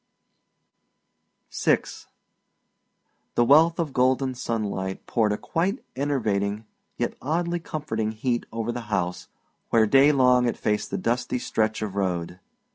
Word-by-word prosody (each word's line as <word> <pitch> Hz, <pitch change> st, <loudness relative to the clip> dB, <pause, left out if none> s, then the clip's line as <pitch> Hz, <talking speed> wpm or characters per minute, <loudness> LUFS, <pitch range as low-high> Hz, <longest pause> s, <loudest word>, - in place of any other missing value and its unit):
VI -, -, +2 dB, 1.5 s
The 120 Hz, -, +4 dB
wealth 160 Hz, +5 st, +5 dB
of 160 Hz, -5 st, -2 dB
golden 130 Hz, +1 st, +2 dB
sunlight 105 Hz, -6 st, -3 dB
poured 110 Hz, -3 st, +1 dB
a 105 Hz, -, 0 dB
quite 190 Hz, +9 st, -2 dB
enervating 110 Hz, -7 st, -1 dB, 0.3 s
yet -, -, -1 dB
oddly 170 Hz, +4 st, -1 dB
comforting 145 Hz, -10 st, -3 dB
heat 120 Hz, +2 st, -2 dB
over 115 Hz, +1 st, -2 dB
the 120 Hz, -, -4 dB
house 90 Hz, -3 st, -2 dB, 0.4 s
where 110 Hz, -1 st, +4 dB
day 135 Hz, +6 st, +6 dB
long 125 Hz, -3 st, +4 dB
it 120 Hz, -, -1 dB
faced 105 Hz, -1 st, -1 dB
the -, -, -2 dB
dusty 125 Hz, +2 st, -1 dB
stretch 110 Hz, -2 st, -1 dB
of 105 Hz, -3 st, -4 dB
road. 90 Hz, -2 st, -2 dB
120 Hz, 125 wpm, -25 LUFS, 105-140 Hz, 1.5 s, day